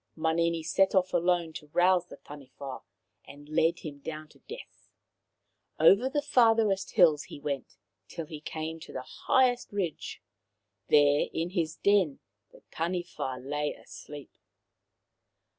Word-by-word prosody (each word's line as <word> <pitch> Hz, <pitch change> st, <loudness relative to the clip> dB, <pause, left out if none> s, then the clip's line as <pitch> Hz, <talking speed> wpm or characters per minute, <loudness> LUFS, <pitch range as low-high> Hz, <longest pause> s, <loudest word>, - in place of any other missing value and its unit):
Manini 165 Hz, +1 st, 0 dB
set 190 Hz, +5 st, +2 dB
off 185 Hz, -1 st, +2 dB
alone 175 Hz, -2 st, +1 dB
to 150 Hz, -, -9 dB
rouse 180 Hz, 0 st, +3 dB
the -, -, -11 dB
Taniwha 135 Hz, -2 st, -9 dB, 0.4 s
and 145 Hz, +1 st, -13 dB
lead 165 Hz, +2 st, +1 dB
him 145 Hz, -3 st, -8 dB
down 155 Hz, +1 st, -7 dB
to -, -, -21 dB
death. 470 Hz, +3 st, -11 dB, 0.9 s
Over 235 Hz, +7 st, +6 dB
the 290 Hz, +2 st, -1 dB
farthest 220 Hz, -5 st, +3 dB
hills 155 Hz, -4 st, +5 dB
he -, -, -10 dB
went, 140 Hz, -2 st, -5 dB, 0.3 s
till 165 Hz, -, -6 dB
he 150 Hz, -1 st, -9 dB
came 160 Hz, +1 st, -5 dB
to -, -, -11 dB
the 130 Hz, -, -5 dB
highest 250 Hz, -, +1 dB
ridge. 185 Hz, -6 st, -4 dB, 0.7 s
There 145 Hz, 0 st, +4 dB
in 165 Hz, +2 st, -2 dB
his 165 Hz, -4 st, -1 dB
den 195 Hz, -9 st, +2 dB, 0.3 s
the -, -, -19 dB
Taniwha 170 Hz, -6 st, -3 dB
lay 145 Hz, +1 st, -2 dB
asleep. 145 Hz, -2 st, -11 dB
165 Hz, 135 wpm, -29 LUFS, 150-185 Hz, 0.9 s, Over